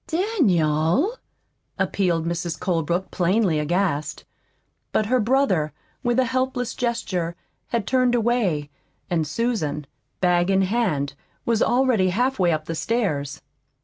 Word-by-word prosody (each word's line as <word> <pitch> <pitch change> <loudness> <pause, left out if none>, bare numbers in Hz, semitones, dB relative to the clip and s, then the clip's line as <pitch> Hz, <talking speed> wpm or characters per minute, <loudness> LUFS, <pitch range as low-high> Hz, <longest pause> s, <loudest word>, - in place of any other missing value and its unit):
"Daniel!" 275 - +2 0.6
appealed 175 -5 0
Mrs. 170 0 -3
Colebrook, 175 +1 -1
plainly 185 -2 +2
aghast. 155 -1 -1 0.7
But 215 - +1
her 250 +4 +2
brother, 210 - +2 0.3
with 240 0 0
a 260 - +4
helpless 255 -1 -1
gesture, 185 -8 -2 0.3
had 230 -4 -1
turned 255 0 +2
away, 210 -11 0 0.4
and 165 -3 +1
Susan, 155 - -1 0.3
bag 175 0 +2
in 195 0 +3
hand, 185 -10 0 0.3
was 230 -2 +1
already 240 -7 +3
halfway 220 -3 +1
up 155 -1 -1
the 165 - -3
stairs. 160 - -1
190 Hz, 115 wpm, -23 LUFS, 165-240 Hz, 0.7 s, a